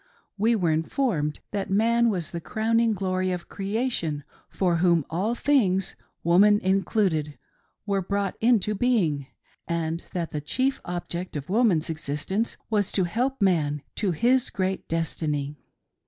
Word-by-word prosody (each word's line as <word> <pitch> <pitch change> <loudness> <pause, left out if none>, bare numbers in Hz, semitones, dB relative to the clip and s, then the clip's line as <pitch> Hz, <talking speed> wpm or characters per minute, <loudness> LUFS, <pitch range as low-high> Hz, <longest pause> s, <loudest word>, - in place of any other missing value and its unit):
We 220 +3 +2
were 175 -6 +1
informed 160 - 0
that 200 -2 -2
man 230 +4 +3
was 180 -6 -2
the 170 - -4
crowning 225 +4 +1
glory 185 -2 -1
of 180 -1 -4
creation, 195 - -2 0.3
for 180 -3 +1
whom 170 -3 +3
all 200 +8 0
things 200 -10 +2
— - - -48
woman 200 +5 +5
included 190 -5 +1 0.2
— - - -45
were 200 -2 0
brought 200 +1 -1
into 225 -3 +3
being; 190 - +1 0.4
and 165 0 -2
that 170 -3 -3
the 150 - -3
chief 260 - 0
object 175 0 -5
of 145 +1 -5
woman's 200 -7 +3
existence 160 +8 -2
was 205 -3 0
to 190 - +2
help 240 +7 -1
man 150 -6 +1
to 205 - +1
his 240 +9 +2
great 190 0 -2
destiny. 150 -3 -2
190 Hz, 145 wpm, -26 LUFS, 165-220 Hz, 0.4 s, woman